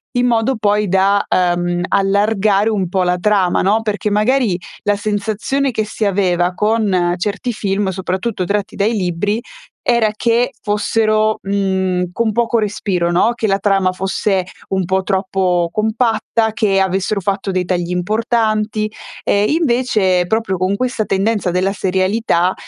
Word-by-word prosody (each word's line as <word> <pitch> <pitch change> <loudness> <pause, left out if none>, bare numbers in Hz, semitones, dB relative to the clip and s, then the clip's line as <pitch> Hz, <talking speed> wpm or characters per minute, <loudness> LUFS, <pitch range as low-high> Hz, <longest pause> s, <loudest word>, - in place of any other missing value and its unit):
in 245 0 +2
modo 235 +2 +1
poi 210 -1 +1
da, 195 +2 +2
ehm, 175 -1 0
allargare 200 +1 +2
un 195 -5 -1
po' 185 +1 +1
la 180 0 +1
trama, 195 -2 +2
no, 210 +4 +2
perché 210 -1 -1
magari 215 -1 +2 0.3
la 205 0 +2
sensazione 215 +7 -1
che 220 -3 -1
si 215 0 -3
aveva 180 -3 +1
con 205 -5 +1
certi 205 +6 -2
film, 200 -1 -1
soprattutto 190 +2 -3
tratti 200 +1 -2
dai 210 +3 +1
libri, 205 +2 -1 0.5
era 235 -3 +3
che 235 +2 +1
fossero, 215 +1 +1
mhmm, 190 -2 -1
con 230 +1 0
poco 235 +2 +1
respiro, 195 -5 -1
no, 215 +7 +2
che 220 - -1
la 195 - +2
trama 195 -2 +2
fosse 190 0 -1 0.2
un 190 -2 0
po' 190 +1 +1
troppo 190 -3 0
compatta, 220 0 0
che 205 -3 +1
avessero 190 +2 0
fatto 195 +1 -2
dei 185 -1 -1
tagli 175 -1 -1
importanti, 215 +2 0 0.4
ehm, 205 +1 +2
invece 235 - +1
proprio 220 0 -1
con 185 +2 0
questa 250 -2 -1
tendenza 200 -1 0
della 185 +2 0
serialità, 190 -1 +1
200 Hz, 145 wpm, -17 LUFS, 185-220 Hz, 0.5 s, era